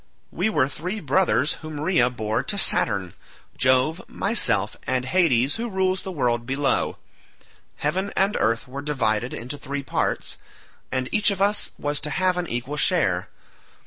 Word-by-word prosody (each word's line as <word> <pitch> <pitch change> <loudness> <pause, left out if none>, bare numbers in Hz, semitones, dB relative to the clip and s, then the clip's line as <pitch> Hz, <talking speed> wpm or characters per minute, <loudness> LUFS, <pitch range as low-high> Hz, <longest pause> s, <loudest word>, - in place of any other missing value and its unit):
We - - 0
were 145 -10 +2
three 180 +9 -4
brothers 155 -3 +2
whom 155 -2 -6
Rhea 150 -6 +3
bore 110 -2 -2
to 205 - -1
Saturn—Jove, 130 - +1
myself, 195 - +1
and 130 -1 0
Hades 140 -5 +2
who 235 +1 -3
rules 190 -1 0
the 190 - -6
world 120 -7 0
below. 135 +1 0 0.8
Heaven 190 +7 -2
and 195 +2 +2
earth 115 +3 0
were 135 +2 -6
divided 125 -5 0
into 130 +5 -6
three 140 0 -4
parts, - - -2 0.5
and 130 0 -1
each 210 +1 +4
of 200 -2 -2
us 205 +2 +2
was 145 0 -1
to 155 - -2
have 180 +4 +1
an 175 - -3
equal 125 +5 -3
share. 100 - +1
145 Hz, 150 wpm, -24 LUFS, 125-185 Hz, 0.8 s, each